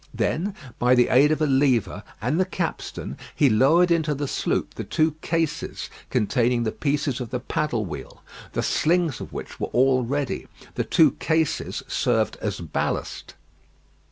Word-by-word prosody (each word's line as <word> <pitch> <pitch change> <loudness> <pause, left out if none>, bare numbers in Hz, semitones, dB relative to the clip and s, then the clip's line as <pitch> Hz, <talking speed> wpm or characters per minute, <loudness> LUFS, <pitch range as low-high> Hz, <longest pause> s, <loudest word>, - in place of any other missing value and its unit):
Then 190 +5 -1 0.2
by 125 +1 +4
the 125 -1 +4
aid 140 +4 +5
of 155 0 +1
a - - +4
lever 135 -5 +2 0.2
and 130 - 0
the 185 - +3
capstan, 180 -2 -4 0.2
he 140 -5 +4
lowered 160 +11 +4
into 160 -3 +2
the 145 +1 -3
sloop - - -1
the - - -5
two 155 0 +1
cases 165 -2 -2 0.2
containing 120 +2 +1
the 110 - -1
pieces 140 -2 -1
of 120 - -5
the 125 - -2
paddle 125 -3 -1
wheel, 85 - -8 0.3
the - - -1
slings 170 -3 +1
of - - -7
which - - -7
were - - -1
all 130 0 +3
ready. 140 +2 -2 0.3
The - - -2
two 155 -4 +5
cases 160 -1 0
served 110 -3 +1
as 100 -3 -3
ballast. 80 - -3
140 Hz, 160 wpm, -24 LUFS, 120-160 Hz, 0.3 s, aid